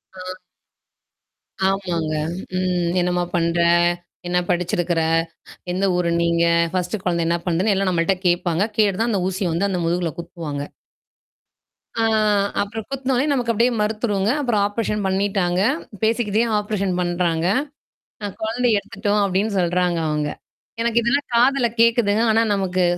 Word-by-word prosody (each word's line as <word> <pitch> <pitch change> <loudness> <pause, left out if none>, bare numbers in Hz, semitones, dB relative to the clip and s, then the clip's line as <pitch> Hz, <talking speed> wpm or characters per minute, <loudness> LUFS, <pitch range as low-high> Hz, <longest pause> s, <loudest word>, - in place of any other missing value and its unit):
ஆ. - - -11 1.5
ஆமாங்க. 175 -5 -1 0.4
ம் 180 -2 0
என்னம்மா 180 0 0
பண்ற? 170 0 +1 0.7
என்ன 180 0 +1
படிச்சிருக்கிற? 175 -1 0 0.7
எந்த 190 +2 -1
ஊர் 180 -1 0
நீங்க 170 0 +2 0.3
ஃபர்ஸ்ட்ட் 185 +2 -2
குழந்தை 170 -2 0
என்ன 170 - +2
பண்ணுதுன்னு 180 +5 +1
எல்லாம் 195 -1 +1
நம்மள்ட 175 +2 +1
கேட்பாங்க. 175 0 +1
கேட்டு 205 -4 +3
தான் 230 +1 +1
அந்த 200 -4 0
ஊசிய 185 -1 -2
வந்து 195 +5 0
அந்த 180 - -1
முதுகுல 175 0 0
குத்துவாங்க. 155 -4 -5 1.3
ஆ. 225 - 0 0.6
அப்புறம் 210 +1 -4
குத்துனோனே! 265 -1 0
நமக்கு 245 -4 0
அப்பிடியே 235 +3 +2
மரத்துருங்க. 210 -1 0
அப்புறம் 235 -7 +1
ஆப்ரேஷன் 210 0 -2
பண்ணிட்டாங்க. 190 -2 0 0.4
பேசிக்கிட்டயே 225 0 +1
ஆப்ரேஷன் 200 -3 -2
பண்றாங்க. 175 -2 0 0.8
அ - - -1
குழந்தை 235 +3 0
எடுத்துட்டோம் 205 +1 -1
அப்பிடின்னு 200 +2 0
சொல்றாங்க 175 0 +1
அவுங்க. 150 -1 -1 0.5
எனக்கு 235 0 +2
இதெல்லாம் 275 +5 0
காதல 250 +1 +4 0.2
கேட்குதுங்க. 230 -2 +3
ஆனா 225 - +3
நமக்கு 185 -2 0
190 Hz, 130 wpm, -21 LUFS, 175-220 Hz, 1.5 s, காதல